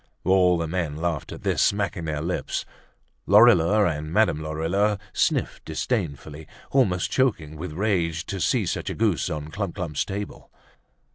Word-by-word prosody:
All 90 -1 +4
the 85 - -1
men 85 -3 -2
laughed 80 -2 -3
at - - -9
this, - - +1
smacking 100 -4 0
their 75 -1 -3
lips. 90 +2 -2 0.6
Lorilleux 105 -1 +6
and 75 -2 -2
Madame 105 -5 +2
Lorilleux 85 +7 0 0.2
sniffed - - 0
disdainfully, 80 - -3 0.2
almost 95 -10 +2
choking 95 - 0
with 80 +1 -6
rage 85 -3 0
to 100 - -4
see - - +2
such - - -3
a - - -4
goose - - +1
on 75 0 -5
Clump 95 +1 -4
clump's 85 -7 -2
table. 100 +1 -6
85 Hz, 150 wpm, -24 LUFS, 80-100 Hz, 0.6 s, Lorilleux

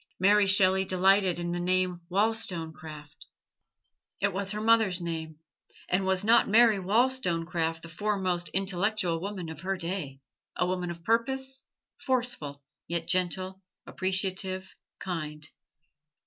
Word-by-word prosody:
Mary 200 +2 +5
Shelley 190 -1 +4
delighted 190 0 +3
in 175 0 -3
the 175 - -2
name 180 0 0
Wollstonecraft. 165 -8 -2 0.9
It 200 -1 +1
was 195 +1 -2
her 210 +1 -2
mother's 220 -4 +3
name; 160 -2 -5 0.5
and 190 +1 0
was 190 0 +2
not 230 +1 +5
Mary 220 -1 +5
Wollstonecraft 175 -7 0
the - - -8
foremost 185 -1 -1
intellectual 195 -2 +1
woman 195 -3 -5
of 160 0 -8
her 190 +3 -2
day 170 -6 -4 0.4
a - - +2
woman 180 -1 -2
of 170 -1 -8
purpose, 265 +5 -1 0.4
forceful 235 - -1 0.2
yet 170 -1 -2
gentle, 185 +1 -1 0.2
appreciative, 190 0 -2 0.2
kind? 150 -5 -5
185 Hz, 120 wpm, -28 LUFS, 170-205 Hz, 0.9 s, Mary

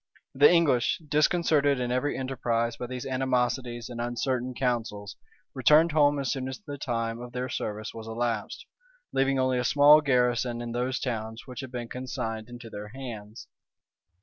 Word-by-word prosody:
The 145 +2 +7
English, 155 -9 +3
disconcerted 150 -2 +3
in 125 -1 -1
every 130 +4 0
enterprise 120 -3 -1
by 125 - -6
these 125 0 -6
animosities 125 -2 -1
and 120 -1 -6
uncertain 125 +1 -2
counsels, 110 -6 -2 0.4
returned 160 +2 +5
home 145 -1 +4
as 140 -2 -1
soon 130 -2 -3
as 130 - -6
the 145 -9 -8
time 115 -2 -2
of 125 0 -9
their 125 +1 -3
service 110 -2 -4
was 110 -1 -8
elapsed, 115 -1 -3 0.5
leaving 135 0 +2
only 130 -1 +1
a - - 0
small 145 +4 +7
garrison 125 -3 +1
in 120 0 -5
those 125 +2 -1
towns 110 -2 -4
which 125 -2 -8
had 130 -2 -7
been 120 -2 -5
consigned 115 -3 -5
into 120 -1 -9
their 105 +1 -7
hands. 110 -3 -8
125 Hz, 165 wpm, -27 LUFS, 120-135 Hz, 0.5 s, The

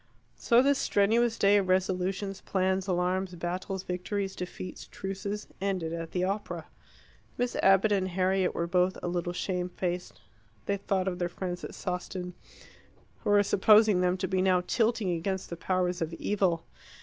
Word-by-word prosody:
So 240 +2 +5
this 280 0 +3
strenuous 225 +3 +2
day 200 +1 +5
of 195 -2 +1
resolutions, 190 +1 0
plans, 190 0 0
alarms, 180 0 0
battles, 180 +2 -4
victories, 190 +2 -3
defeats, 180 0 -7
truces, 200 +2 -5 0.2
ended 185 -5 -1
at 165 -1 -4
the 180 +1 -1
opera. 200 +3 -3 0.7
Miss 245 0 -1
Abbott 195 +2 +4
and 190 -2 +2
Harriet 185 0 +1
were 170 - 0
both 180 +1 +1
a - - -1
little 175 0 -1
shame 180 0 -2
faced. 180 0 -4 0.5
They 200 - 0
thought 195 -1 -1
of 180 -1 -2
their 175 -1 0
friends 180 0 -5
at - - -7
Sawston, 180 0 -4 0.9
who - - -3
were 205 0 +5
supposing 210 -1 +5
them 180 0 +2
to - - -2
be 185 -1 +1
now 185 -1 +3
tilting 225 -4 +1
against 185 +3 -2
the - - -3
powers 180 0 -1
of 165 0 -2
evil. 180 -4 0
185 Hz, 160 wpm, -29 LUFS, 180-200 Hz, 0.9 s, So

